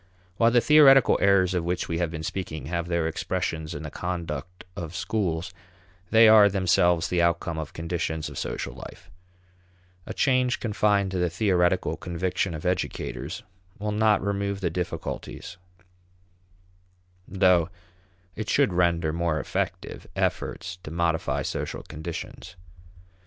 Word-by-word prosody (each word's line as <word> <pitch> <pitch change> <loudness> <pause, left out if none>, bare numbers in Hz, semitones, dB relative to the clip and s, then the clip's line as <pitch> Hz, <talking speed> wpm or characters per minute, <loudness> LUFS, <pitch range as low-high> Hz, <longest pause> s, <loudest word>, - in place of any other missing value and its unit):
While 115 - +5
the 120 0 +4
theoretical 135 -2 +6
errors 95 -2 +4
of 90 -2 0
which 90 +1 -2
we 85 0 -2
have 85 -2 0
been 80 -1 -6
speaking 80 -5 -5
have 85 +2 -3
their 85 -2 0
expressions 80 0 -3
in 75 - -6
the 75 - -6
conduct 90 -1 -5
of 85 -3 -6
schools, 90 -3 -2 0.6
they 115 0 +7
are 110 -2 +8
themselves 90 -3 +2
the 90 -1 +1
outcome 85 -1 0
of 80 - -6
conditions 80 -2 -3
of - - -7
social - - -4
life. 90 0 -12 1.0
A - - -4
change 130 -2 +2
confined 105 -3 +1
to 95 - -2
the 90 0 +1
theoretical 90 0 +1
conviction 90 0 -2
of 80 - -8
educators 90 -3 -3 0.3
will 105 +1 -3
not 105 -1 +2
remove 100 0 -1
the 90 -4 -1
difficulties, 90 +1 -5 1.7
though 90 -2 +3 0.7
it 110 0 -5
should 140 -9 +3
render 85 -3 +1
more 85 -2 0
effective - - -4
efforts 90 0 -2
to 75 - -9
modify 80 0 0
social - - -4
conditions. 80 +2 -8
90 Hz, 135 wpm, -26 LUFS, 85-100 Hz, 1.7 s, are